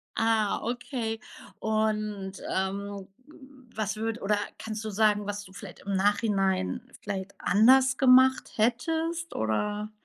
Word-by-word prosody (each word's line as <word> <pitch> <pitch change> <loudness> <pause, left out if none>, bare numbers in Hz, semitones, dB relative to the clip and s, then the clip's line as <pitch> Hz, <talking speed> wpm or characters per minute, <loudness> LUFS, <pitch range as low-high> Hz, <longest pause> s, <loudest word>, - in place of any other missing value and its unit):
Ah, 220 -2 +2
okay. 235 -1 -3 0.4
Und, 215 -3 -1 0.2
ähm, 195 +1 -3 0.2
w 265 -4 -17
was 215 -1 -2
würd 225 +1 -3
oder 210 +1 +1 0.2
kannst 220 0 -5
du 215 - -2
sagen, 210 0 +2
was 205 0 -4
du 190 -1 -15
vielleicht 200 -3 -10
im 200 0 -3
Nachhinein 195 -2 +1 0.2
vielleicht 200 -1 -5
anders 260 +7 +5
gemacht 260 0 +5
hättest, 320 +9 0
oder 205 - -1
215 Hz, 125 wpm, -28 LUFS, 200-240 Hz, 0.4 s, anders